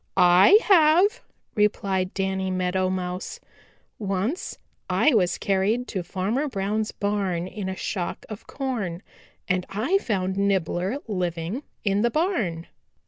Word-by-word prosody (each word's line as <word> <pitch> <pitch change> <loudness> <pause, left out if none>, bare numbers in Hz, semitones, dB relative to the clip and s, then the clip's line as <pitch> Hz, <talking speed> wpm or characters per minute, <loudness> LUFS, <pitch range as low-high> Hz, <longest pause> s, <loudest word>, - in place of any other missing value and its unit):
"I 180 - +7
have," 360 +3 +5 0.3
replied 195 -3 0
Danny 190 -1 -1
Meadow 185 0 0
Mouse. 185 - -4 0.6
"Once 205 - -2 0.3
I 305 - +3
was 185 -6 +2
carried 205 +5 0
to 190 - -2
Farmer 200 - -2
Brown's 215 -2 -2
barn 200 -4 -1
in 190 0 -5
a 190 - -3
shock 185 -2 -4
of 215 -2 -9
corn 220 -11 -3 0.4
and 185 -1 +1
I 255 - +1
found 190 - -2
Nibbler 195 - 0
living 180 - -2 0.2
in 200 0 +1
the 235 - +3
barn." 235 - -1
195 Hz, 125 wpm, -25 LUFS, 185-230 Hz, 0.6 s, I